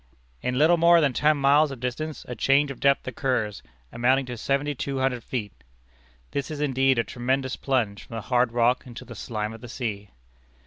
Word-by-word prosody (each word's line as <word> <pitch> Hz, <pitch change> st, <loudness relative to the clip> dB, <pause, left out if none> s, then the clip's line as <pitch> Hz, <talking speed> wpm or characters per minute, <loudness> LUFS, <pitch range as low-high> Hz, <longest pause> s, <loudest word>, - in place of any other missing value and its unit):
"In 125 Hz, 0 st, -1 dB
little 160 Hz, +5 st, +5 dB
more 170 Hz, +1 st, +6 dB
than 145 Hz, -5 st, +2 dB
ten 150 Hz, +4 st, +3 dB
miles 145 Hz, +2 st, +4 dB
of 135 Hz, -3 st, -7 dB
distance 145 Hz, +5 st, -4 dB
a 125 Hz, -, -4 dB
change 135 Hz, +5 st, +2 dB
of 135 Hz, -, -9 dB
depth 140 Hz, -1 st, +2 dB
occurs, 120 Hz, -5 st, -1 dB, 0.3 s
amounting 130 Hz, +3 st, +2 dB
to 125 Hz, -1 st, -6 dB
seventy 140 Hz, +5 st, -1 dB
two 135 Hz, 0 st, -4 dB
hundred 130 Hz, -3 st, 0 dB
feet." 110 Hz, -6 st, -4 dB, 0.8 s
This 140 Hz, -2 st, -3 dB
is 155 Hz, -2 st, -5 dB
indeed 135 Hz, -2 st, +2 dB
a 115 Hz, -, +3 dB
tremendous 130 Hz, +2 st, -2 dB
plunge 120 Hz, -7 st, -1 dB
from 115 Hz, -, -8 dB
the 115 Hz, -, -3 dB
hard 125 Hz, +1 st, +1 dB
rock 120 Hz, +2 st, +1 dB
into 125 Hz, +1 st, -9 dB
the 120 Hz, -, -9 dB
slime 110 Hz, -1 st, -4 dB
of 115 Hz, -, -11 dB
the 120 Hz, -, -9 dB
sea. 105 Hz, -5 st, -4 dB
130 Hz, 195 wpm, -25 LUFS, 120-140 Hz, 0.8 s, more